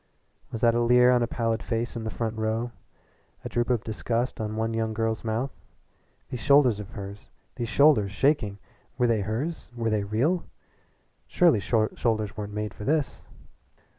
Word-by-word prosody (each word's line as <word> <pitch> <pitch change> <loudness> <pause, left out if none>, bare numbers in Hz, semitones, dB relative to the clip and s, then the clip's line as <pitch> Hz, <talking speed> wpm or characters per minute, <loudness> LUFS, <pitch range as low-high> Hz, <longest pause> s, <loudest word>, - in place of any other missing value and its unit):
Was 115 - -5
that 115 -1 +5
a 120 - +1
leer 125 +1 +5
on 125 -1 +3
a 120 - +1
pallid 115 -1 -1
face 115 0 -2
in 115 - -4
the - - -2
front 110 0 -3
row, 110 +2 -1 0.7
a - - -3
droop 120 +1 -1
of 120 -4 +1
disgust 115 +2 -2
on 110 0 -3
one 110 +1 -1
young 110 -1 -1
girl's 110 0 -1
mouth? 115 +4 -1 0.8
These 125 - -4
shoulders 130 -5 +4
of 100 -1 -7
hers 100 0 -9 0.3
these 120 -1 -3
shoulders 135 -10 +4
shaking 110 -3 +1 0.4
were 125 - +3
they 115 -3 +2
hers? 120 - -3
Were 115 -2 -1
they 105 -1 +1
real? 130 - +1 0.8
Surely 170 -11 +4
shoulders 110 0 0
weren't 105 -1 -5
made 105 0 -4
for - - -9
this! 145 +1 0
115 Hz, 170 wpm, -26 LUFS, 110-125 Hz, 0.8 s, that